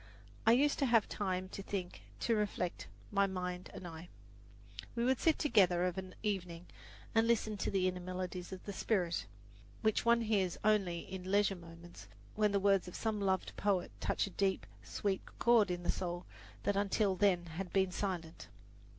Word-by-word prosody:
I 225 - +8
used 285 +4 +3
to 275 - +3
have 230 -3 +4
time 185 -2 -2
to 195 - -6
think, 190 -2 -4 0.2
to 235 - +2
reflect, 205 -4 -2 0.2
my 200 -1 +3
mind 180 -1 -4
and 180 - -8
I. 165 +1 -9 0.9
We 235 0 +1
would 260 0 +2
sit 320 - +3
together 185 - +4
of 180 -1 -1
an 185 -1 -8
evening 180 -5 -2 0.5
and 225 0 +4
listen 220 -2 +2
to - - -1
the 190 -2 +2
inner 180 0 -2
melodies 180 0 -5
of 190 - -7
the 200 - -5
spirit, 180 -5 0 0.6
which 220 -1 +2
one 235 0 +4
hears 200 -5 +1
only 195 -5 +2
in 185 -1 -7
leisure 200 -1 +3
moments 170 0 -12 0.3
when 210 -1 +2
the 200 - +2
words 195 -2 +3
of 180 - -8
some 220 -2 -1
loved 190 -1 0
poet 195 -3 +1
touch - - 0
a 195 - -8
deep, 195 +1 0 0.2
sweet 195 -2 -2 0.2
chord 235 -4 +5
in 175 0 -3
the - - +2
soul 175 -1 -4 0.4
that 205 - +1
until 200 0 +2
then 185 -3 +3
had 175 +2 -6
been 190 -1 +2
silent. 180 -4 -4
190 Hz, 180 wpm, -35 LUFS, 180-210 Hz, 0.9 s, I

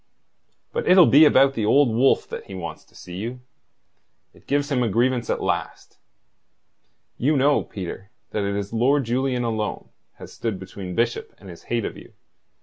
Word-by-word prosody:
"But 475 - -2
it'll 180 -2 +8
be 150 +3 +7
about 135 -2 +5
the 115 - -2
Old 135 +5 +4
Wolf 120 +4 +2
that - - -7
he 95 - -9
wants 85 -4 -7
to - - -27
see 90 0 -9
you. 120 +5 -5 0.9
It - - -22
gives 145 +1 0
him 130 -3 +1
a 120 - +1
grievance 120 +2 0
at - - -1
last. - - -4 1.2
You 145 +4 +2
know, 140 +2 +3
Peter, 95 +1 -8 0.2
that 105 - -2
it 100 0 -2
is 100 +1 -4
Lord 135 +5 +2
Julian 125 +1 -1
alone 110 -2 -3 0.3
has - - -12
stood 110 -4 -3
between 95 -1 -8
Bishop 115 0 -1
and 100 - -13
his 85 - -13
hate 115 -2 0
of - - -6
you. - - -14
120 Hz, 180 wpm, -23 LUFS, 100-135 Hz, 1.2 s, it'll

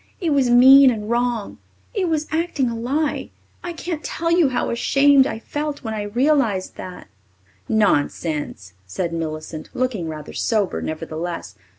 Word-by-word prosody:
It 335 -4 -1
was 275 -4 +2
mean 265 +3 +8
and 215 -2 -3
wrong. 240 -3 -1 0.3
It 385 -6 0
was 310 -2 0
acting 315 -6 0
a - - -4
lie. 280 +6 -2 0.3
I 350 - -4
can't 335 -1 -5
tell 335 0 -2
you 340 -4 +4
how 255 - -1
ashamed 275 +3 +4
I - - -4
felt 295 +5 -5
when 220 -2 -4
I 215 - -3
realized 225 -2 +1
that." 180 - -9 0.6
"Nonsense," 150 - 0
said 170 - -3
Millicent, 155 -1 -5
looking 245 -10 -1
rather 155 -2 -7
sober, 210 -4 0
nevertheless. 160 - -5
240 Hz, 150 wpm, -21 LUFS, 175-285 Hz, 0.6 s, mean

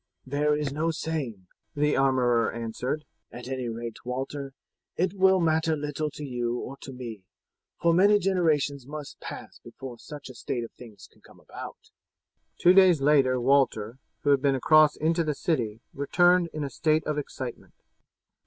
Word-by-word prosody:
"There 150 +2 +1
is 145 -2 -2
no 155 +3 0
saying," 145 - -4 0.3
the 150 0 +2
armourer 125 -3 +2
answered; 120 +6 -4 0.3
"at 125 0 -9
any 130 -2 -3
rate, 115 0 -6
Walter, 135 +2 -5 0.4
it 185 +1 0
will 190 -1 +4
matter 160 -1 +2
little 150 +1 -3
to 150 - -6
you 120 -2 -2
or 135 - -6
to 135 - -10
me, 120 -5 -7 0.6
for 170 +2 +3
many 200 +4 +5
generations 155 -8 +1
must 150 -1 -8
pass - - -9
before 130 -3 -9
such 145 -2 -9
a 130 - -9
state 120 0 -4
of 115 - -8
things 110 -5 -13
can - - -26
come - - -19
about." - - -10 0.7
Two 180 - +6
days 185 -4 +6
later 135 -3 +3
Walter, 125 -3 +2 0.2
who 145 - +3
had 140 -2 +4
been 140 -1 +2
across 155 +3 +5
into 165 +2 +1
the 150 -2 -1
city, 115 -10 -1
returned 175 +5 +3
in 155 - -4
a 140 - -4
state 155 +4 +1
of 150 -1 -1
excitement. 130 -3 -7
140 Hz, 165 wpm, -27 LUFS, 125-155 Hz, 0.7 s, Two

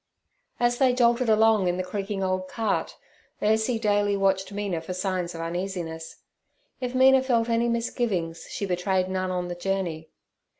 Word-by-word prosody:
As 240 0 +1
they 255 -2 +4
jolted 240 0 +3
along, 220 -3 +4
in 175 0 0
the 185 - -1
creaking 195 +1 -3
old 185 0 -1
cart, 220 0 -2 0.4
Ursie 220 +2 +1
daily 205 -2 +2
watched 195 0 +1
Mina 200 -5 -3
for 180 +3 -6
signs 185 -2 -2
of 165 - -5
uneasiness. 170 -2 -5 0.6
If 250 0 -4
Mina 265 +1 +6
felt 240 -3 +1
any 230 +1 +2
misgivings 220 -8 -2
she 200 - -3
betrayed 185 0 0
none 185 0 -1
on 180 -1 -2
the 175 - -4
journey. 175 -3 -3
195 Hz, 160 wpm, -26 LUFS, 180-230 Hz, 0.6 s, Mina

